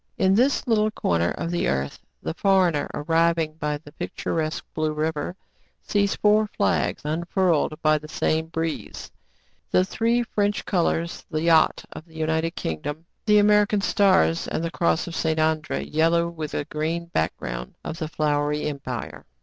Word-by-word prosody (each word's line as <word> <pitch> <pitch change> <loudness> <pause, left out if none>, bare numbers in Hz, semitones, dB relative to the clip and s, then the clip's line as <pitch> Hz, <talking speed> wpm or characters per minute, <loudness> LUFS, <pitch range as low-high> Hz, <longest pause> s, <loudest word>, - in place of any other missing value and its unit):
In 190 0 +3
this 255 +7 +3
little 215 -3 +2
corner 85 - 0
of 170 - -3
the 175 - 0
earth, 70 +1 -2 0.2
the - - -2
foreigner, 180 -5 +2
arriving 165 +1 +1
by 150 -1 -1
the 145 0 -15
picturesque 155 +1 -3
Blue 155 -1 -1
River, 155 +3 -2 0.5
sees 200 -1 +1
four 210 +1 +3
flags - - 0
unfurled 165 0 0
by 155 0 +4
the 155 - -11
same 160 +1 0
breeze, 165 -1 -4 0.3
— - - -40
the 185 - +4
three 230 +5 +1
French 205 -2 -1
colors, 170 -2 0
the 155 -1 -2
"yacht" 165 -1 +4
of 155 - -9
the 160 -2 -20
United 160 +1 -1
King 80 -1 -3
dom, 150 +3 -5 0.2
the 210 0 +6
American 210 0 +4
stars, 190 -5 +3
and 160 - -2
the 165 - -2
cross 85 - +1
of 170 - -7
St. 160 -1 0
André, 155 -1 0
yellow 165 +2 +3
with 160 -3 -6
a - - -2
green 160 +3 -2
background, 65 - -3
of 160 - -5
the 160 - -2
Flowery 150 -1 0
Empire. 140 -5 -5
160 Hz, 165 wpm, -24 LUFS, 150-185 Hz, 0.5 s, the